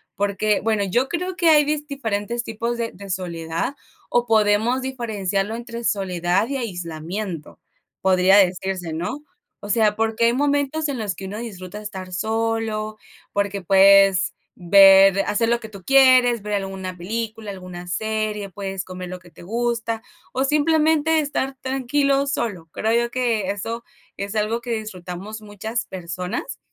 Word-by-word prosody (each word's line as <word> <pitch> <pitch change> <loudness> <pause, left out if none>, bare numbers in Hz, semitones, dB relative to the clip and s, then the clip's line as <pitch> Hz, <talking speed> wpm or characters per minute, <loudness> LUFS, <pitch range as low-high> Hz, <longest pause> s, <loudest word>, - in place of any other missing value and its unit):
porque 205 +1 +1
bueno, 215 -2 +1
yo 240 +8 +1
creo 360 +1 -2
que 335 -1 +3
hay 300 -1 +7
disti 295 -1 -2
diferentes 230 -1 -2
tipos 230 +2 -3
de 230 -1 -2
de 195 +1 -11
soledad. 170 - -3 0.3
O 240 0 +2
podemos 220 +3 +3
diferenciarlo 215 -6 -2
entre 235 0 -7
soledad 185 -1 0
y 280 - -3
aislamiento, 175 - -5 0.4
podría 190 +1 +5
decirse, 185 -2 +1
¿no? 175 - -3 0.4
O 205 - -9
sea, 215 -1 +3
porque 225 +1 +1
hay 235 - +4
momentos 285 +3 +1
en 280 - -3
los 210 -4 -2
que 190 - -8
uno 205 +3 -5
disfruta 210 -3 -7
estar 190 -3 -7
solo, 220 +1 -1 0.4
porque 200 -1 -1
puedes 195 0 +5 0.2
ver 195 +1 +7
hacer 225 +3 +1
lo 235 0 +2
que 220 - -9
tú 200 -3 -12
quieres, 255 -2 +5
ver 210 +1 -4
alguna 190 -2 -3
película, 220 +3 -4
alguna 180 -2 -8
serie, 215 +1 -2
puedes 195 -1 -5
comer 185 -1 -7
lo 185 - -6
que 175 -1 -17
te 170 - -15
gusta, 230 +1 -2 0.3
o 265 +1 0
simplemente 315 +1 +3
estar 270 -2 -2
tranquilo 275 +2 +1
solo. 200 -11 -3
Creo 220 +1 0
yo 235 0 +1
que 230 -6 0
eso 230 +4 -4 0.3
es 200 +2 -5
algo 220 +3 0
que 240 0 -5
disfrutamos 195 +1 -7
muchas 215 +3 -4
personas, 180 0 -5
215 Hz, 155 wpm, -22 LUFS, 190-235 Hz, 0.4 s, hay